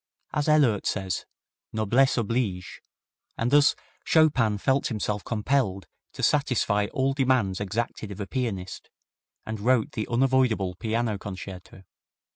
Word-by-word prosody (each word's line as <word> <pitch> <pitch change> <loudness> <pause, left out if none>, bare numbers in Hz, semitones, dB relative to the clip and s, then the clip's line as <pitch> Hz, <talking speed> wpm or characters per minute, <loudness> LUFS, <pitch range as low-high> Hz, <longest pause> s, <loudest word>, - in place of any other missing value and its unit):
As 150 0 0
Ehlert 135 -10 +3
says, 95 -2 -2 0.4
"Noblesse 115 +6 +2
oblige 110 -5 -2 0.6
and 115 +2 -1
thus 145 0 +5 0.3
Chopin 130 -10 +3
felt 135 +6 +1
himself 105 -3 -2
compelled 110 - 0 0.3
to - - -7
satisfy 125 -8 +2
all 135 +1 +1
demands 130 -9 +1
exacted 110 +1 -3
of 100 - -8
a 100 - -3
pianist, 100 -6 -4 0.6
and 110 -1 -5
wrote 120 +1 +2
the 110 - -4
unavoidable 120 -6 +2
piano 110 +1 -2
concerto. 95 -1 -9
110 Hz, 120 wpm, -26 LUFS, 100-130 Hz, 0.6 s, thus